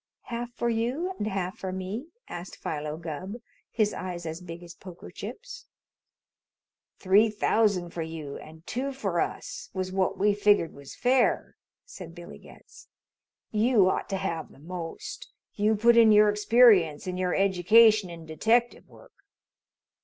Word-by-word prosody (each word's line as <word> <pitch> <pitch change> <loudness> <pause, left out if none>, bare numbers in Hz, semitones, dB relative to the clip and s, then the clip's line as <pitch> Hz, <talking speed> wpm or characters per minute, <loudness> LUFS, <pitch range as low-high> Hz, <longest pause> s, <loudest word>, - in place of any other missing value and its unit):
"Half 240 0 -6
for 235 - -1
you 245 +11 -1
and 210 - -2
half 195 0 -3
for 190 - -4
me?" 190 - -5 0.2
asked 175 +1 -8
Philo 150 0 -4
Gubb, 170 +5 -6 0.3
his 215 -2 0
eyes 175 -2 -6
as 160 +2 -5
big 170 -1 -9
as 170 0 -11
poker 180 -2 -12
chips. 480 - -9 1.3
"Three 205 +4 +4
thousand 205 -4 +1
for 170 - -5
you 160 -3 -6
and 160 +1 -13
two 270 +3 -3
for 195 -10 -2
us, - - -5
was 185 0 -3
what 190 0 0
we 205 +1 +3
figured 205 -5 +2
was 140 -1 -12
fair," 250 0 +1 0.3
said 180 - -11
Billy 175 -1 -11
Getz. - - -17 0.6
"You 215 -3 +3
ought - - -3
to 195 - -1
have 170 -4 -4
the - - -18
most. 170 - -7 0.2
You 215 +1 +2
put 235 +3 +4
in 230 -2 +7
your 210 0 +6
experience 210 -7 +4
and 185 0 -4
your 180 -1 0
education 200 +2 +5
in 165 -1 -10
detective 225 +10 +1
work." - - -18
195 Hz, 155 wpm, -27 LUFS, 175-225 Hz, 1.3 s, in